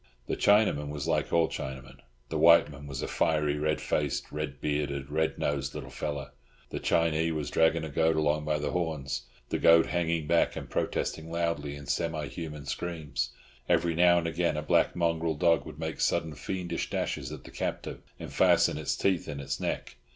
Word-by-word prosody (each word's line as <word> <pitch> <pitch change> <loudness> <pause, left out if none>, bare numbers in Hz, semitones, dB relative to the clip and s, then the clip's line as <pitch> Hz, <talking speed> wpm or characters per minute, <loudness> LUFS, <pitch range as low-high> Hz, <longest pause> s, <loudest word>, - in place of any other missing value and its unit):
The - - -2
Chinaman 100 -9 +3
was 75 +1 -4
like 75 -2 0
all 85 -1 +4
Chinamen; 65 0 -6 0.3
the - - -2
white 85 -2 +7
man 70 0 -10
was 70 -1 -4
a - - -2
fiery, 75 -2 +1
red 75 +1 0
faced, 75 -2 -1
red 75 -2 -4
bearded, 70 -2 -2
red 80 +1 0
nosed 70 -1 -1
little - - -6
fellow. 75 -2 -4 0.4
The - - -3
Chinee 80 0 +2
was 75 -2 -3
dragging 80 0 +3
a 80 - -4
goat 80 +2 +2
along 75 0 +1
by 75 0 0
the 75 -1 -2
horns, 70 -8 -2 0.2
the - - -1
goat 85 0 +7
hanging 85 -2 0
back 85 +2 +2
and - - -6
protesting 80 0 -2
loudly 85 -4 -1
in 70 0 -9
semi 80 0 -1
human 75 0 -7
screams; 75 -6 -3 0.4
every 85 0 +3
now 85 +1 +5
and 85 - 0
again 85 -1 0
a 75 - -2
black - - +2
mongrel 85 -2 0
dog 85 +1 +2
would - - -9
make 80 0 -4
sudden 80 -2 +1
fiendish 90 +4 -3
dashes - - -2
at - - -8
the - - -12
captive, - - -4 0.2
and - - -8
fasten 75 - +4
its 75 - -1
teeth 95 -3 +1
in 70 - -5
its 70 -1 -3
neck. - - -3
75 Hz, 190 wpm, -29 LUFS, 70-85 Hz, 0.4 s, white